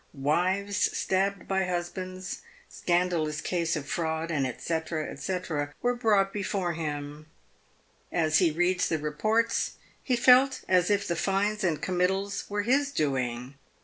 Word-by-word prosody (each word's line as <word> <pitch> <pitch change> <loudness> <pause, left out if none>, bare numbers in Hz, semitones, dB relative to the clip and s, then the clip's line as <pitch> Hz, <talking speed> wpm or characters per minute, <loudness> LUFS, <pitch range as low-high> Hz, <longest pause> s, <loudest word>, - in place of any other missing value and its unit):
Wives 185 +8 +1
stabbed 195 0 0
by 190 -1 +1
husbands, 185 +1 -4 0.3
scandalous 175 -4 0
case 170 0 -1
of 150 -3 -5
fraud, 160 0 -2
&c. 150 +2 -1 0.4
&c, 190 -1 -2 0.5
were 245 0 +3
brought 210 -5 +2
before 195 -3 -1
him. 150 -1 -5 0.8
As 155 -2 +3
he 180 -3 +4
read 175 +3 +1
the 160 - +1
reports, 215 +10 0 0.3
he 255 - +1
felt 255 +2 +5
as 180 0 +3
if 200 -1 +1
the 170 - 0
fines 200 +4 0
and 165 -5 +1
committals 190 +2 0
were 205 0 -1
his 275 +5 +2
doing. 130 - -1
180 Hz, 130 wpm, -28 LUFS, 160-200 Hz, 0.8 s, felt